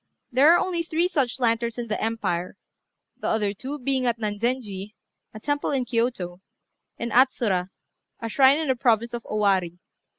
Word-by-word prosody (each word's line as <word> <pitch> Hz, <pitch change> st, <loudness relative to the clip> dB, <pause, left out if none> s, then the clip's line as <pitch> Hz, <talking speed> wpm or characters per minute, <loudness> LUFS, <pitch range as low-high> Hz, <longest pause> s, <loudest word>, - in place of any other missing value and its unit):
There 275 Hz, +6 st, +6 dB
are 345 Hz, -, +6 dB
only 350 Hz, -2 st, -1 dB
three 335 Hz, +1 st, 0 dB
such 270 Hz, -8 st, -1 dB
lanterns 235 Hz, -1 st, 0 dB
in 240 Hz, -, -3 dB
the 215 Hz, -, -2 dB
empire; 195 Hz, -5 st, -2 dB, 0.6 s
the -, -, -4 dB
other 210 Hz, -2 st, +1 dB
two 265 Hz, +8 st, -6 dB
being 265 Hz, -2 st, 0 dB
at 235 Hz, -1 st, +1 dB
Nanzenji 210 Hz, -2 st, -3 dB, 0.4 s
a 215 Hz, -, -9 dB
temple 290 Hz, +5 st, -1 dB
in 265 Hz, -3 st, 0 dB
Kiyôto, 230 Hz, -7 st, -1 dB, 0.6 s
and 235 Hz, 0 st, -4 dB
Atsura, 220 Hz, -8 st, +2 dB, 0.5 s
a 230 Hz, -, -4 dB
shrine 265 Hz, +4 st, +5 dB
in 315 Hz, -3 st, -2 dB
the 260 Hz, -, +3 dB
province 235 Hz, -1 st, +1 dB
of 240 Hz, -, -3 dB
Owari. 195 Hz, -5 st, +1 dB
235 Hz, 165 wpm, -25 LUFS, 210-265 Hz, 0.6 s, There